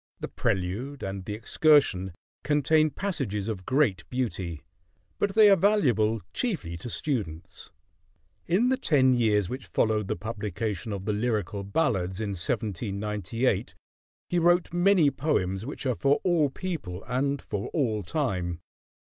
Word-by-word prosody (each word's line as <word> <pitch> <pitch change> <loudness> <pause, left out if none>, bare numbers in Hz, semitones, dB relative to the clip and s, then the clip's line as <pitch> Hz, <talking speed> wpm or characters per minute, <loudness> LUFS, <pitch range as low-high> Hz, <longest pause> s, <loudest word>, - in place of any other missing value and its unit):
"The - - -4
Prelude" 105 +10 -2
and 95 0 -4
"The 105 - -4
Excursion" 110 - +3 0.3
contain 150 +2 +3
passages 135 - -3
of 100 -5 -5
great 130 - +1
beauty; 95 - -3 0.6
but 200 -1 0
they 215 -1 +8
are - - +8
valuable 125 - +2
chiefly 170 - -2
to 105 +8 -7
students. 90 - -4 0.8
In 205 +9 +3
the 260 - +2
ten 130 - +3
years 105 -5 +2
which 130 +5 -6
followed 110 -2 +1
the - - -1
publication 105 -1 -4
of 100 -1 -5
the 105 - 0
"Lyrical 105 -3 -1
Ballads" 95 - 0
in 110 -2 -2
1798 105 +3 -1 0.5
he 175 - +1
wrote 175 +1 +3
many 175 -4 +4
poems 110 - -1
which 145 - -6
are 130 - +2
for 140 +1 +3
all 170 -5 +3
people 135 - -5
and 135 +3 -1
for 105 -4 -4
all 115 -9 0
time. 90 - -2
115 Hz, 140 wpm, -27 LUFS, 100-150 Hz, 0.8 s, they